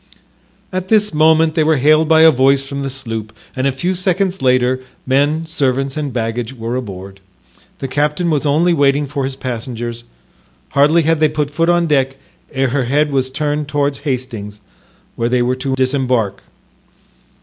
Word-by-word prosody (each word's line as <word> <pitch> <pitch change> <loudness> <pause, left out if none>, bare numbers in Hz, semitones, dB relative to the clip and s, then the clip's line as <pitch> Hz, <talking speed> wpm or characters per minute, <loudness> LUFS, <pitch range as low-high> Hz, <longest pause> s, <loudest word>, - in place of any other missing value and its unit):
At 185 0 -3
this 210 -1 +2
moment 160 +1 +4
they 160 -1 +2
were 160 +1 +3
hailed 155 +3 +3
by 160 0 +5
a 160 - +8
voice 135 0 +3
from 140 0 -6
the 140 0 -3
sloop 115 -5 -5 0.2
and 130 +1 0
a - - +1
few 175 +8 -1
seconds 185 0 0
later 130 0 +2 0.2
men, 145 +5 +1
servants 135 -4 -1
and 150 -3 -3
baggage 115 +1 -3
were 115 0 -4
aboard. 100 -5 -7 0.6
The 135 - -4
captain 150 +5 0
was 150 -3 0
only 155 +4 +2
waiting 145 -1 +2
for 140 -1 -3
his 135 0 -4
passengers; 120 -2 -5 0.7
hardly 150 +4 +3
had 165 0 +1
they 155 -1 +3
put 150 -1 -2
foot 165 +3 0
on 175 0 +3
deck 135 -3 +1 0.3
ere 135 -2 0
her 130 0 0
head 145 +4 +1
was 130 -1 0
turned 150 +1 -2
towards 145 -1 -1
Hastings, 120 -7 -4 0.6
where 115 0 -1
they 125 0 +2
were 125 +1 0
to 130 +1 -2
disembark. 130 -6 0
140 Hz, 170 wpm, -17 LUFS, 130-155 Hz, 0.7 s, a